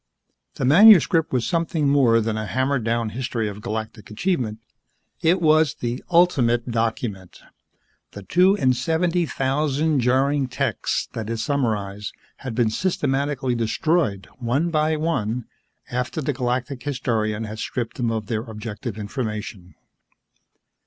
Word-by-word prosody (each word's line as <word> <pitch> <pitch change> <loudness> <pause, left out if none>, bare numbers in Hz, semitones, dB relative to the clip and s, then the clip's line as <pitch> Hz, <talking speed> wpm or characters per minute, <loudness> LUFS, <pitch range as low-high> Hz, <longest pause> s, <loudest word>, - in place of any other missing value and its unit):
The 130 - -2
manuscript 170 - +6
was 125 -3 0
something 165 -3 0
more 130 -5 +4
than 110 0 -1
a 110 -1 -3
hammered 130 0 0
down 115 0 0
history 115 -1 -3
of 105 0 -7
galactic 110 -1 -5
achievement. 115 - -1 0.6
It 175 +4 +3
was 155 -4 +3
the 120 +1 -4
ultimate 130 -9 +3
document. 110 -4 -3 0.7
The 100 - -9
two 185 - +3
and 130 -5 +2
seventy 165 +5 0
thousand 145 +2 0
jarring 135 +3 +2
texts - - -2
that 110 -1 -5
it 115 - -2
summarized 105 -6 -2 0.2
had 130 -4 -6
been 115 -2 +2
systematically 140 -4 -1
destroyed, 115 - 0
one 135 +8 0
by 155 0 +1
one, 125 -8 -1 0.5
after 125 +5 -2
the 145 -1 -1
Galactic 125 +1 -2
Historian 115 -6 -1
had 110 0 -7
stripped 120 +4 -4
them 120 -3 0
of 110 -2 -2
their 110 0 -2
objective 110 0 -7
information. 105 -4 -5
125 Hz, 130 wpm, -23 LUFS, 110-145 Hz, 0.7 s, manuscript